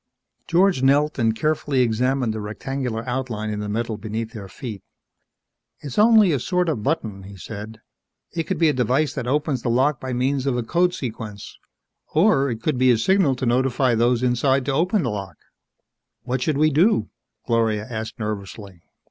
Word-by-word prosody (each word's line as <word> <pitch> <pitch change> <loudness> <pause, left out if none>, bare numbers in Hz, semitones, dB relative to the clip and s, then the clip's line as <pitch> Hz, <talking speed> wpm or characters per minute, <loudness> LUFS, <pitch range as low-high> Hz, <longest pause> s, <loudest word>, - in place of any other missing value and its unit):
George 175 -3 +3
knelt 140 +2 +2
and 115 -1 +2
carefully 150 -1 0
examined 125 +1 +1
the 110 - -4
rectangular 115 +2 -4
outline 120 -4 -3
in 105 - -3
the 105 0 -4
metal 115 +1 -2
beneath 110 +1 -4
their 105 -4 -8
feet. 110 -2 -7 1.0
"It's 140 +3 -4
only 215 -3 +6
a 140 - +1
sort 180 +5 0
of 135 -9 -2
button," 110 -7 -2
he 100 +1 -11
said. 110 +3 -8 0.5
"It 165 -1 -3
could 190 - -2
be 165 - +3
a 150 - +3
device 130 +4 +1
that 120 - -4
opens 145 -1 0
the 120 - -2
lock 130 +3 +2
by 130 - -4
means 130 +2 0
of 125 -3 +1
a 120 - -1
code 175 +8 +1
sequence 110 -5 -7 0.6
or 155 -5 +4
it 115 -2 -5
could 150 -5 0
be 130 0 +4
a 120 - +5
signal 160 - +2
to 130 - -3
notify 125 +1 +2
those 120 +2 +2
inside 130 +2 +2
to 140 - 0
open 180 +6 +1
the 120 - -1
lock." 100 -4 -6 0.9
"What 130 0 -2
should 145 +2 0
we 155 +1 +3
do?" 155 - +3 0.4
Gloria 110 -2 +1
asked 110 -2 -5
nervously. 100 -4 -6
125 Hz, 180 wpm, -22 LUFS, 110-145 Hz, 1.0 s, only